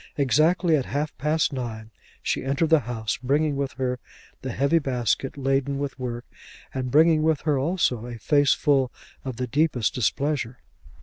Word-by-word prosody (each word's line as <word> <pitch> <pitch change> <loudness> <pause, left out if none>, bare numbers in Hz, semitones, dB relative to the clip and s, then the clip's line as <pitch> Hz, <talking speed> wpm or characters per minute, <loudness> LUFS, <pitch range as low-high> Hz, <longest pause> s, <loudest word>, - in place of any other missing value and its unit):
Exactly 155 +5 +3
at 135 -4 0
half 150 +2 -2
past 150 +2 +1
nine 110 -4 -5 0.3
she - - -1
entered 140 +4 0
the 160 - +7
house, 110 -2 -2
bringing 145 +3 +1
with 140 -1 -2
her 125 -1 -2 0.4
the 130 - -4
heavy 140 +7 +2
basket 130 -1 -1
laden 135 0 0
with 140 -2 -4
work, 120 -1 -4 0.5
and 130 -1 -3
bringing 155 +3 +5
with 155 -2 +1
her 150 -4 +1
also 130 -6 0
a 120 -1 -7
face 145 +3 +3
full 135 -4 +2 0.3
of 130 -3 -5
the 125 - -1
deepest 140 -2 +1
displeasure. 135 -1 -1
135 Hz, 165 wpm, -25 LUFS, 125-150 Hz, 0.5 s, the